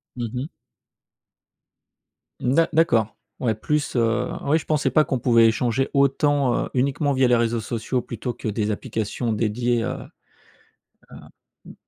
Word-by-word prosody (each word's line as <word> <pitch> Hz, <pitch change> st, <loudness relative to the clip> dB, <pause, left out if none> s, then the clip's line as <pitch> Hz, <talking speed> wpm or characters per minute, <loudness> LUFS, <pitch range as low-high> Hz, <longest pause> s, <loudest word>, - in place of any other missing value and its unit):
Mmh 120 Hz, -2 st, -4 dB
mh. 130 Hz, +3 st, -3 dB, 1.9 s
D'a 155 Hz, +7 st, +2 dB
d'accord. 115 Hz, -10 st, +2 dB, 0.2 s
Ouais, 115 Hz, -4 st, 0 dB
plus, 150 Hz, +6 st, -2 dB
heu, 120 Hz, +1 st, +1 dB
oui 145 Hz, +3 st, +2 dB
je 165 Hz, -, -6 dB
pensais 150 Hz, -3 st, +1 dB
pas 155 Hz, +4 st, +4 dB
qu'on 130 Hz, -3 st, -1 dB
pouvait 115 Hz, -2 st, +5 dB
échanger 120 Hz, +3 st, 0 dB
autant, 140 Hz, -2 st, +2 dB
heu, -, -, -9 dB
uniquement 140 Hz, +3 st, +1 dB
via 130 Hz, -1 st, +3 dB
les 120 Hz, -, +4 dB
réseaux 115 Hz, 0 st, +1 dB
sociaux 115 Hz, +3 st, -2 dB
plutôt 120 Hz, 0 st, -5 dB
que -, -, -7 dB
des 105 Hz, 0 st, -1 dB
applications 110 Hz, +2 st, -3 dB
dédiées, 115 Hz, +2 st, 0 dB
heu, 130 Hz, +2 st, -3 dB, 1.2 s
heu, -, -, -10 dB, 0.5 s
mmh. -, -, -11 dB
125 Hz, 145 wpm, -23 LUFS, 115-135 Hz, 1.9 s, pouvait